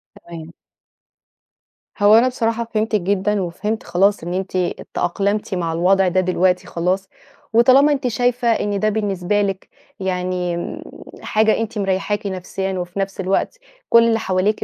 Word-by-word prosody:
تمام. 165 -1 -10 1.5
هو 205 +1 +6
أنا 235 +3 +5
بصراحة 235 -2 -1
فهمتِك 215 -1 0
جدًا 200 +2 0
وفهمت 205 +5 -3
خلاص 195 +1 +1
إن 175 +1 -4
أنتِ 190 0 -3 0.4
تأقلمتِ 200 +3 -1
مع 170 -2 -2
الوضع 185 +3 +3
ده 185 +1 +1
دلوقتي 185 0 +1
خلاص، 185 +3 -2 0.4
وطالما 260 +5 +5
أنتِ 275 -3 0
شايفة 245 +1 0
إن 205 -3 +1
ده 215 - +2
بالنسبة 205 -2 -1
لِك 195 -2 -3 0.3
يعني 180 -2 -2 0.6
حاجة 215 0 +2
أنتِ 225 -1 -4
مريحاكِ 200 +1 -1
نفسيًا، 190 0 -4
وفي 175 +2 -5
نفس 195 0 -3
الوقت 195 - -1 0.3
كل 230 0 +6
اللي 225 -1 +2
حواليكِ 190 +3 0
195 Hz, 140 wpm, -20 LUFS, 185-215 Hz, 1.5 s, هو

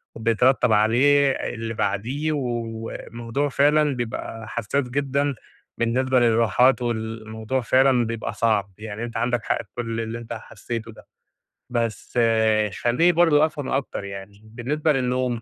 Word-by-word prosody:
وبيترتب 115 +2 +2
عليه 135 +7 +4
اللي 115 -3 -4
بعديه، 125 +10 -1
والموضوع 120 0 -3
فعلًا 145 +1 +3
بيبقى 115 -1 -5
حساس 120 +4 -2
جدًا، 140 +1 0 0.4
بالنسبة 130 +2 +2
للراحات 120 +2 +3
والموضوع 110 +1 -3
فعلًا 130 0 +3
بيبقى 115 0 -4
صعب، 105 -4 +1
يعني 110 +1 -6
أنت 120 -1 -5
عندك 120 -1 0
حق - - 0
في - - -29
كل 115 -1 -3
اللي 115 +1 -4
أنت 115 - -7
حسيته 115 -1 -6
ده، 110 - -16 0.6
بس 115 0 -2 0.6
خليني 125 +9 +4
برضو 160 -3 +4
أفهم 150 -3 -5
أكتر 135 -6 -2
يعني، 100 +1 -9
بالنسبة 140 +8 -1
للنوم، 125 -2 -1
120 Hz, 130 wpm, -23 LUFS, 115-135 Hz, 0.6 s, عليه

